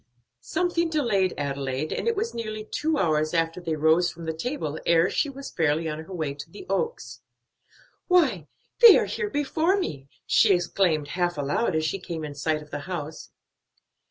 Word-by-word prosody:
Something 340 - 0
delayed 225 - +1
Adelaide, 140 0 -2
and - - -3
it 460 - +2
was 440 +3 -2
nearly 215 -2 -5
two 305 +7 -1
hours 155 - +1
after 165 +2 0
they 165 -2 -2
rose 160 +3 +3
from 170 0 -9
the 160 - -2
table 160 - -4
ere 170 +1 +3
she 290 - 0
was 275 0 -8
fairly 160 0 +1
on 155 0 -4
her 190 - -13
way 155 -6 -3
to 145 0 -10
the 385 - -11
Oaks. 475 0 -3 0.9
"Why, 275 - +3 0.3
they 470 -3 +10
are - - +1
here 450 -2 -3
before 320 +4 +1
me!" 140 - -4 0.2
she 205 -4 +5
exclaimed 170 -4 0
half 175 -1 -1
aloud 145 +7 0
as 155 0 +1
she 195 +5 -2
came 170 -3 -6
in 150 - -6
sight 150 +2 -1
of 150 - -19
the 145 - -4
house. 155 -3 -6
175 Hz, 185 wpm, -25 LUFS, -, 0.9 s, they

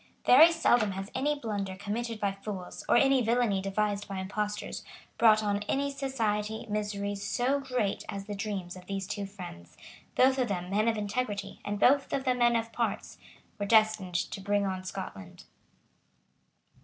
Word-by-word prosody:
Very 310 +7 +8
seldom 240 -11 +3
has 195 +1 -6
any 290 +3 0
blunder 205 -7 -3
committed 215 +3 -4
by 200 -1 +1
fools, 195 -2 -7
or - - +5
any 270 0 +4
villany 230 -4 +2
devised 205 +1 -1
by 195 -1 -5
impostors, 210 +2 -3 0.4
brought 220 -2 +6
on 205 -1 0
any 280 +1 0
society 220 -6 -2
miseries 205 -1 -2
so 260 +3 +1
great 250 -7 -1
as 195 0 -5
the 205 - -5
dreams 200 -3 -4
of 180 -1 -12
these 195 -1 -3
two 200 +1 -4
friends, 180 - -10 0.4
both 260 +1 +4
of 250 - +2
them 180 -3 -3
men 210 +3 +2
of 225 -1 +2
integrity 205 -1 -3
and 205 0 -3
both 275 +5 +4
of 270 - 0
them 255 -2 +1
men 240 0 +4
of 230 0 -2
parts, - - -2 0.4
were 205 - -1
destined 215 -4 +3
to 195 - -2
bring 205 +1 +1
on 185 -1 -3
Scotland. 100 - -7
210 Hz, 170 wpm, -29 LUFS, 195-240 Hz, 0.4 s, Very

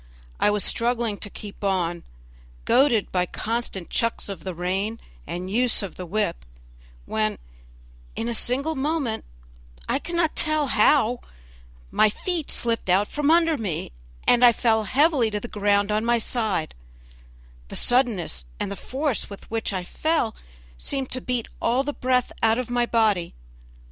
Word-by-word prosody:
I - - +4
was 210 -1 +1
struggling 235 -3 +1
to 205 - -5
keep 205 0 -10
on, 175 -3 0 0.6
goaded 250 -6 +3
by 180 -1 +1
constant 225 -5 -3
chucks 230 -2 -1
of 195 - -6
the 185 -2 -5
rein 190 +6 -2 0.3
and 180 +1 -4
use 230 +2 +3
of 195 - -5
the 180 - -8
whip, 185 - -1 0.6
when 105 - -1 0.8
in 230 - -2
a 235 - -1
single 270 +7 0
moment 275 -5 -1 0.6
I - - +1
cannot 340 -2 -1
tell 310 -1 +2
how 240 +1 +4 0.7
my 215 - +4
feet 335 - -3
slipped 230 -4 0 0.2
from 295 0 0
under 330 -2 +4
me, 180 -8 -3 0.4
and 245 0 +5
I 240 -1 +8
fell 220 -2 +2
heavily 275 - +3
to 210 -1 -2
the 240 - -6
ground 205 -1 +1
on 215 +1 +1
my 235 +1 +3
side; 220 -8 -1 0.9
the - - -8
suddenness 230 - +1
and - - -2
the - - -3
force 270 +3 -2
with 200 +1 -11
which 225 -1 -1
I 185 -2 -2
fell 310 - 0 0.4
seemed 270 -2 -2
to 255 - -1
beat 245 -2 -2
all 250 +3 +2
the 290 +1 -3
breath 255 -1 +1
out 225 0 +4
of 250 -1 -3
my 240 0 +1
body. 215 -7 +1
230 Hz, 155 wpm, -24 LUFS, 200-255 Hz, 0.9 s, I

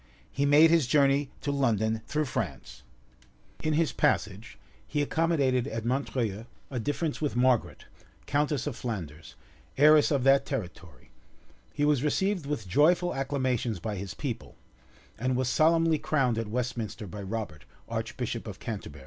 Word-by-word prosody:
He 140 +1 0
made 155 +3 +6
his 165 -6 +3
journey 140 0 +3
to 145 - -1
London 110 -5 +1
through 150 +1 0
France; 125 - -5 0.8
in 155 0 0
his 160 0 +2
passage, 105 +2 -1 0.3
he 145 -1 0
accommodated 140 -6 +1
at 115 -4 -4
Montreuil 120 -4 -2 0.2
a 125 - -2
difference 145 +6 -2
with 150 -5 -1
Margaret, 125 -1 +1 0.4
countess 145 -2 0
of 145 -5 -3
Flanders, 80 -11 -6 0.4
heiress 150 +1 +6
of 140 -4 +1
that 135 +1 +5
territory;[] 90 - -7 0.6
he 145 - 0
was 150 -4 +3
received 180 +2 0
with 130 -9 -3
joyful 170 - +3
acclamations 130 -6 -1
by 105 +5 -4
his 95 -3 -6
people, - - -5 0.6
and 130 +2 0
was 130 0 0
solemnly 165 +1 +3
crowned 130 -8 +1
at 115 - -3
Westminster 115 -1 -3
by 100 +2 -8
Robert, 95 -6 -5 0.2
archbishop - - -4
of - - -7
Canterbury. - - -6
130 Hz, 145 wpm, -28 LUFS, 110-150 Hz, 0.8 s, made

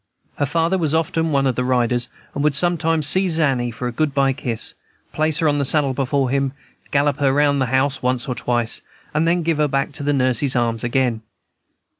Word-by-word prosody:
Her 145 - +1
father 170 +4 +1
was 160 -2 0
often 165 0 0
one 140 -1 +2
of 130 - +2
the 125 - -2
riders, 125 -1 +1 0.2
and 140 - -2
would 150 -2 +2
sometimes 165 -1 +1
seize 180 +1 +3
Annie 135 -6 +1
for 120 +2 -5
a - - -3
good 145 +3 -1
by 135 -1 +2
kiss, 120 -5 -2 0.4
place 155 0 +1
her 165 - +2
on 145 -1 +1
the - - +1
saddle 140 -1 +2
before 135 0 0
him, 135 -1 0 0.4
gallop 145 0 +1
her 140 -2 +3
round 145 0 +2
the 130 - +1
house 130 +2 0
once 125 +1 -1
or 130 - -1
twice, 120 -1 -1 0.3
and 155 +2 +1
then 170 +1 +1
give 165 -1 0
her 150 - +3
back 135 +2 -1
to 145 - -6
her 145 - +1
nurse's 130 0 +1
arms 115 -2 0
again. 120 -2 0
140 Hz, 215 wpm, -20 LUFS, 125-155 Hz, 0.4 s, seize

